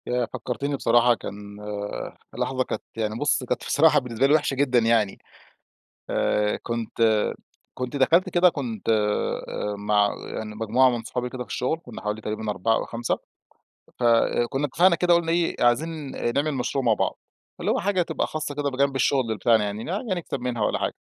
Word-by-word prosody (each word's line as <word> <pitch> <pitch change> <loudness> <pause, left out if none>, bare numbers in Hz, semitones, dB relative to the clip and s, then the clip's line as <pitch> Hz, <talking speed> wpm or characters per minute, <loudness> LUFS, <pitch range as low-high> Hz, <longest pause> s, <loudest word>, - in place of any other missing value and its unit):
ياه! 125 0 +1
فكّرتني 140 +3 -3
بصراحة 120 -1 +4
كان 100 -2 -7 1.0
لحظة 130 -1 0
كانت - - -4 0.2
يعني 110 -1 -1
بُص 145 -2 +1
كانت 125 0 -2
بصراحة 160 +2 +5
بالنسبة 125 +1 0
لي 145 - +4
وحشة 150 -3 +2
جدًا 130 -2 +3
يعني. 115 -3 +2 0.9
آآ 105 0 +1
كنت 115 -1 -3 0.7
كنت 125 +2 -4
دخلت 160 +7 +4
كده 180 +1 +5
كنت 125 - -5
آآ 105 -1 0
مع 105 0 +3 0.2
يعني 105 -1 -5
مجموعة 115 +4 +3
من 120 -2 -3
صحابي 125 +2 -3
كده 125 -1 -5
في - - -23
الشغل، 130 +6 -1
كنا 120 -5 -9
حوالي 105 +1 -3
تقريبًا 110 0 -3
4 110 +2 +1
أو - - -1
5، 115 0 -2 0.8
فكنا 120 +3 +2
اتفقنا 170 +6 +4
كده 175 +1 +3
قُلنا 170 -1 +2
إيه 170 0 +1
عايزين 150 +4 0 0.2
نعمل 145 +2 +1
مشروع 135 +1 -1
مع 115 - +5
بعض، - - -1 0.4
فاللي - - -1
هو - - +1
حاجة 190 -1 +1
تبقى 165 -2 -1
خاصة 155 -2 -4
كده 145 0 -1
بجانب 140 +1 0
الشغل 130 -3 +1
بتاعنا 110 +1 +3
يعني 105 +2 -4
ن - - -7 0.3
نكسب 165 -5 -4
منها 125 -2 -2
والّا - - 0
حاجة. - - -1
125 Hz, 175 wpm, -25 LUFS, 115-145 Hz, 1.0 s, بصراحة